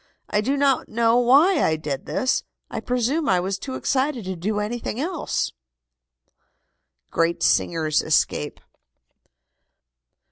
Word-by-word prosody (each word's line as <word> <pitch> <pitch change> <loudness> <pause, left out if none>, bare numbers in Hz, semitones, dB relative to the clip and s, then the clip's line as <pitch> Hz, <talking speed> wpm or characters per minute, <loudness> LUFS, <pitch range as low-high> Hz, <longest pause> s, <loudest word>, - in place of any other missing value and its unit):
I 210 - +2
do 270 +6 0
not 275 -2 +2
know 230 +1 +2
why 290 +8 +5
I 160 - +2
did 150 -3 -5
this. 260 - 0 0.3
I - - -3
presume 255 +5 0
I 185 - +3
was 190 +2 -2
too 260 +3 -6
excited 265 -4 -1
to 190 0 -3
do 205 +5 -2
anything 225 +2 -3
else." 335 +3 -2 1.6
GREAT 165 +1 0
SINGERS 155 -3 +2
ESCAPE. 150 -1 0
230 Hz, 120 wpm, -23 LUFS, 180-270 Hz, 1.6 s, why